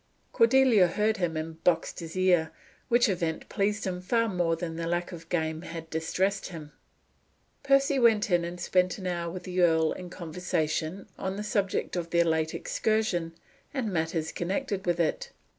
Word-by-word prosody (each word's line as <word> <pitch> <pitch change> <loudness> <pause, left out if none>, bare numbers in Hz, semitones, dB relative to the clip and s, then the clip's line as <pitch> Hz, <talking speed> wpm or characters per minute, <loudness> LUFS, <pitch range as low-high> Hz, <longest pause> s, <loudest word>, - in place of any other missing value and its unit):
Cordelia 230 -5 +5
heard 210 +5 +1
him, 170 -4 -1
and 160 +1 -6
boxed 165 -2 +1
his 165 +1 -7
ear, 180 -4 +3 0.4
which 240 0 +5
event 170 -5 -2
pleased 205 +1 0
him 180 -1 -3
far 230 +5 +1
more 175 -5 +1
than 165 0 -5
the 165 0 -3
lack 175 +1 -1
of 165 -1 -10
game 160 -2 -1
had 165 -2 -7
distressed 190 +5 -1
him. 155 -4 -9 0.9
Percy 275 0 +3
went 220 -4 +4
in 175 -1 +3
and 175 +1 -5
spent 180 +1 +1
an 190 - -8
hour 170 -2 -2
with 180 +1 -7
the 185 0 -1
earl 160 -2 +4
in 180 -1 -6
conversation 170 0 -2
on 190 0 -2
the 210 - -4
subject 205 -5 -1
of 170 -2 -3
their 170 0 +3
late 160 -1 0
excursion 190 -7 -1 0.4
and 230 -7 -1
matters 160 -1 -1
connected 195 +2 -3
with 175 0 +1
it. 165 -2 0
175 Hz, 175 wpm, -28 LUFS, 165-200 Hz, 0.9 s, Cordelia